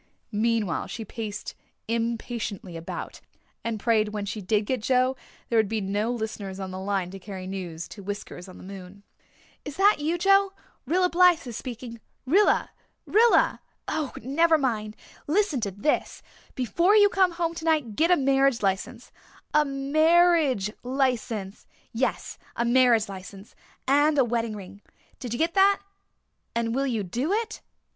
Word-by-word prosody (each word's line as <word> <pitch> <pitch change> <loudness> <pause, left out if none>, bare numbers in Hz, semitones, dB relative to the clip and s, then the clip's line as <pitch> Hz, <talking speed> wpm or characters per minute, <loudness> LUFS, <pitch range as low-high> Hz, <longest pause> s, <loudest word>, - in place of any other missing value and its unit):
Meanwhile, 215 -4 0
she 225 - -6
paced 210 -1 -6 0.3
impatiently 230 -5 -3
about, 165 0 -7 0.4
and 230 -2 -3
prayed 220 0 +2
that - - -6
when 210 -1 -3
she 210 +1 -5
did 210 +2 +1
get 255 0 -1
Joe 255 +2 +2 0.3
there 230 - +2
would 220 - +2
be 220 0 -1
no 205 +3 -1
listeners 215 -4 -5
on 190 -1 -5
the 185 - -6
line 190 -2 -2
to 195 - -8
carry 190 -1 -8
news 180 -4 -6
to 205 - -10
Whiskers 200 -2 -7
on 185 - -12
the - - -12
moon. 195 +1 -10 0.6
"Is 290 - -7
that 400 -2 +5
you, 320 +4 0
Joe? 390 +1 +4 0.3
Rilla 360 +5 +3
Blythe 355 -2 +4
is 240 -3 -7
speaking 235 -1 -7 0.3
Rilla 380 +11 +3 0.3
Rilla 455 +3 +4 0.3
oh, 310 -3 -2
never 320 +6 +3
mind. 220 -6 -2 0.3
Listen 330 - +1
to 205 - -1
this. 205 +10 -1 0.3
Before 340 - +2
you 410 -1 +7
come 380 -3 +2
home 335 -1 -1
tonight 315 -9 0
get 330 +7 +3
a 360 - +5
marriage 270 -3 +2
license 190 -1 -2 0.4
a 300 - +5
marriage 295 - +3
license 245 -6 -2 0.3
yes, 250 +3 -2 0.2
a 235 - 0
marriage 240 -3 +4
license 195 +1 -10 0.3
and 290 +2 +4
a 270 - +5
wedding 230 -2 -1
ring. 200 0 -10 0.4
Did 245 - -6
you 240 - -2
get 330 +4 +1
that? 395 0 +5 0.8
And 230 -1 0
will 275 +2 0
you 225 -5 -1
do 245 - -2
it? 440 0 -2
235 Hz, 160 wpm, -26 LUFS, 205-305 Hz, 0.8 s, you